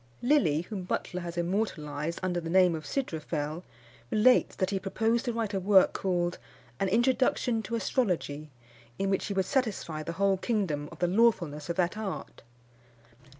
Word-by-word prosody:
Lilly, 195 - +3
whom 195 +2 -6
Butler 180 0 -3
has 170 0 -6
immortalised 170 -4 -2
under 180 -1 0
the 165 - -5
name 180 0 +5
of 155 -2 -5
Sydrophel, 160 - -3 0.5
relates, 245 +4 +4
that 190 0 -1
he 195 - 0
proposed 225 +5 0
to 245 - 0
write 225 -2 -2
a 195 - 0
work 190 0 +5
called 175 -2 -1 0.4
An 195 - +1
Introduction 240 +1 +2
to 230 +1 -4
Astrology, 180 - -1 0.5
in 195 0 0
which 195 - 0
he 200 - -3
would 190 -1 +1
satisfy 205 - -1
the 165 +2 -5
whole 195 +2 +2
kingdom 180 -9 -1
of - - -11
the 175 - +1
lawfulness 175 -7 +2
of 170 - -1
that 180 +4 0
art. 205 -3 -6
185 Hz, 165 wpm, -29 LUFS, 170-220 Hz, 0.5 s, name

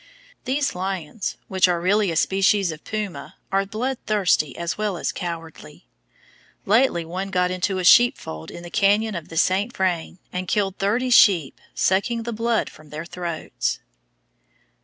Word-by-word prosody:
These 280 +2 0
lions, 185 0 -4
which 190 -1 +3
are 175 -1 +1
really 200 +3 +2
a 165 - -2
species 195 +2 +2
of 155 -1 -10
puma, 205 -10 -5 0.2
are 195 0 +1
bloodthirsty 215 - 0
as 170 0 -2
well 210 -3 -2
as - - -2
cowardly. 165 -2 -7 0.8
Lately 210 -5 +3
one 185 +4 -4
got 180 -1 +1
into 185 +1 -1
a 185 - -2
sheepfold 175 - +4
in 170 - -9
the 175 - -9
canyon 205 +3 +2
of 170 -4 -6
the 165 - -7
St. 195 +7 +2
Vrain, 180 -2 -1 0.2
and 180 0 -3
killed 195 -1 0
thirty 235 +6 0
sheep, 180 - +5
sucking 225 +5 +1
the 235 0 -4
blood 230 0 0
from 155 -1 -14
their 155 +2 -6
throats. 170 -2 -3
190 Hz, 155 wpm, -23 LUFS, 170-210 Hz, 0.8 s, sheep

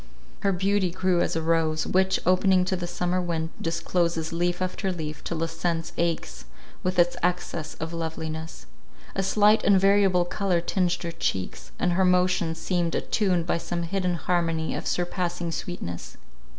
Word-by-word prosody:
Her 200 - +1
beauty 190 +1 +1
grew 180 0 +1
as - - 0
a 165 - -1
rose, 160 -1 +1
which, 190 0 +2
opening 185 0 +4
to 185 - 0
the 175 -1 -4
summer 180 +1 -1
wind, 165 -2 -2
discloses 165 -1 -1
leaf 175 +1 0
after 185 +1 -2
leaf 155 -3 -5
till 170 - -3
the 165 +1 0
sense 165 0 -2
aches 170 -1 -2 0.4
with 185 -1 -1
its 175 0 +4
excess 175 -3 -2
of 160 +1 -5
loveliness. 160 0 -5 0.5
A 195 - 0
slight 210 +3 +4
and 200 -2 +5
variable 195 -2 +4
colour 185 -1 0
tinged 175 0 0
her 170 - -3
cheeks, 95 - -3
and 180 - +1
her 185 +2 +2
motions 180 -2 +2
seemed 175 -1 -1
attuned 185 -6 +1
by 170 - 0
some 170 0 -3
hidden 180 +1 -1
harmony 165 -2 0
of - - -4
surpassing 175 -1 -1
sweetness. 155 - -5
175 Hz, 165 wpm, -26 LUFS, 165-185 Hz, 0.5 s, and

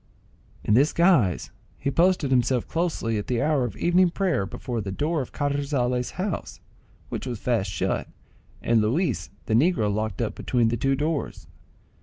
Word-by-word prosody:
In 105 - +2
this 140 +7 +4
guise 165 - +3 0.3
he 140 - -2
posted 170 -3 +2
himself 125 -1 +2
closely 160 -10 -1
at 105 - -6
the 120 -2 0
hour 145 -1 +2
of 115 - -6
evening 180 +1 +3
prayer 170 - 0
before 120 +3 -4
the 100 -1 -4
door 150 - -1
of 130 - -7
Carrizales' 140 -4 -1
house, 185 -2 -4 0.5
which - - -4
was 120 -2 -3
fast 110 -3 0
shut, 95 - -2 0.6
and 115 -1 +3
Luis 115 - 0 0.2
the 110 - -1
negro 115 - +3
locked 110 -2 -2
up - - -1
between 120 -2 +1
the 120 - 0
two 135 +4 +1
doors. 150 +1 -2
130 Hz, 165 wpm, -25 LUFS, 115-160 Hz, 0.6 s, this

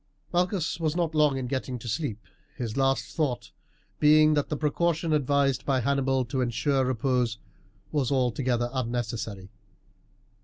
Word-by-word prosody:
Malchus 175 -2 0
was 160 -1 0
not 170 -3 0
long 150 -3 +3
in 130 - -3
getting 130 0 -3
to 120 - -9
sleep, 115 -3 -3 0.3
his 120 -6 -4
last 135 0 0
thought 145 -7 -1 0.5
being 155 +1 +6
that 145 -1 0
the 150 - -2
precaution 160 +2 0
advised 140 -2 +2
by 135 -2 +1
Hannibal 135 0 +1
to 130 +2 -2
ensure 130 +3 +1
repose 125 -2 0 0.5
was 140 -4 0
altogether 125 -2 0
unnecessary. 115 -5 -3
135 Hz, 140 wpm, -27 LUFS, 120-150 Hz, 0.5 s, being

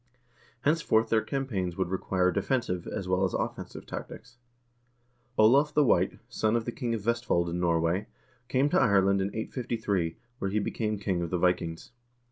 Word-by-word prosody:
Henceforth 140 -8 +2
their 110 -1 +3
campaigns 105 -12 -3
would 95 -2 0
require 95 0 +1
defensive, 90 -7 -1
as 95 - -4
well 90 +1 +1
as 95 - 0
offensive, - - -4
tactics. 125 -1 -8 1.0
Olav 140 +7 +5
the 150 - +5
White, 90 -8 +2
son 110 -2 0
of 115 -1 0
the 120 - -2
king 120 -1 -2
of 110 - -4
Vestfold 115 -6 0
in 85 - -2
Norway, 85 +3 +1 0.4
came 130 +3 +2
to - - +3
Ireland 100 -4 +4
in 95 - 0
853, 110 -5 -2 0.2
where 95 - -1
he 100 - -1
became 105 +1 -1
king 95 -3 -1
of 85 - -2
the 90 - 0
Vikings. 90 +1 0
100 Hz, 165 wpm, -28 LUFS, 90-120 Hz, 1.0 s, Olav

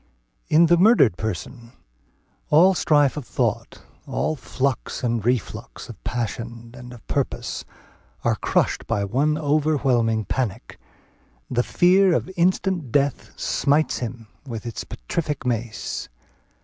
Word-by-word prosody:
In 160 +3 +5
the 170 +1 +4
murdered 190 - +5
person 115 - -5 0.8
all 175 +6 +6
strife 145 -5 +3
of 150 - -3
thought, - - -2 0.2
all 155 - -1
flux 135 -1 -2
and 115 -3 0
reflux 120 -1 -3
of - - -11
passion 115 0 -4
and 125 0 -10
of 120 -2 -13
purpose, 140 -2 -2 0.6
are - - +3
crushed - - 0
by 100 - 0
one 140 +9 +1
overwhelming 140 -7 +1
panic; 120 -3 -3 0.7
the 120 - +2
fear 180 +6 +4
of 185 - -2
instant 180 - +1
death 140 0 0
smites 145 +3 +1
him 120 -1 -5 0.2
"with 120 -5 -7
its 115 - -5
petrific 145 - -4
mace." 115 -2 -3
130 Hz, 125 wpm, -23 LUFS, 115-155 Hz, 0.8 s, all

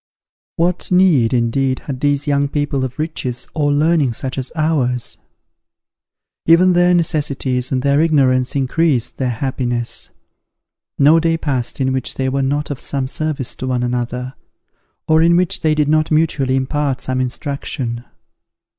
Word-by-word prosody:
What 175 +2 0
need, 180 -11 +4
indeed, 130 +2 0
had 135 -3 -5
these 145 +1 0
young 140 -1 +1
people 145 -2 -1
of 130 -1 -5
riches 130 -6 -4
or 145 -2 +1
learning 150 -3 +2
such 130 +3 -4
as 130 - -4
ours? 140 -6 -1 1.3
Even 180 +3 +6
their 175 0 +4
necessities 140 -6 -1
and 130 -1 0
their 140 +1 +3
ignorance 130 -6 +2
increased 140 -1 0
their 130 -2 0
happiness. 120 -1 -3 0.9
No 150 +4 +5
day 165 0 +1
passed 135 -6 -2
in 130 -1 +1
which 130 - -2
they 130 0 -1
were 135 +1 -1
not 145 +2 -1
of 140 - -5
some 135 -2 -3
service 145 -3 -3
to 130 - -4
one 125 -1 0
another, 125 +1 -3 0.7
or 160 0 +4
in 170 +1 +4
which 180 -1 0
they 155 -1 +2
did 150 -1 +1
not 155 +1 +2
mutually 155 -4 +1
impart 135 0 -1
some 130 0 -1
instruction. 125 -2 -4
140 Hz, 150 wpm, -18 LUFS, 130-155 Hz, 1.3 s, Even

